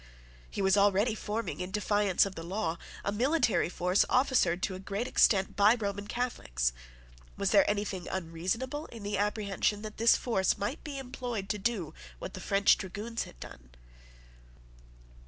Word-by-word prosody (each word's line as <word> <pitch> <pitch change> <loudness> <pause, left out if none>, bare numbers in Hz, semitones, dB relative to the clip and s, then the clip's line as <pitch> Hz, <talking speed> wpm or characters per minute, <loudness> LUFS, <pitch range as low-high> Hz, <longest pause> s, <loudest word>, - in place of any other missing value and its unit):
He 200 - -3
was 190 +1 +4
already 205 +3 +3
forming, 215 -2 -4
in 180 - -4
defiance 205 -1 +2
of 195 - -5
the 165 - -7
law, 170 -1 -2 0.3
a 200 - +1
military 245 - +2
force 180 +2 +2
officered 250 -9 +2
to 195 - 0
a 185 - -6
great 200 +5 -3
extent 195 -6 +3
by 210 +3 +6
Roman 205 -2 -4
Catholics. - - -1 0.6
Was - - 0
there - - +5
anything 200 -3 -2
unreasonable 190 - -3
in 230 -3 -10
the 205 -1 -2
apprehension 205 0 0
that 215 -1 -7
this 230 +1 +5
force 190 -6 +1
might 210 +10 -3
be 290 -3 -6
employed 245 -6 -5
to 210 - -1
do 195 -7 -1 0.2
what - - -7
the - - -7
French 200 +1 +4
dragoons 210 +4 -4
had - - -15
done? 60 0 -11
205 Hz, 160 wpm, -30 LUFS, 190-230 Hz, 0.6 s, by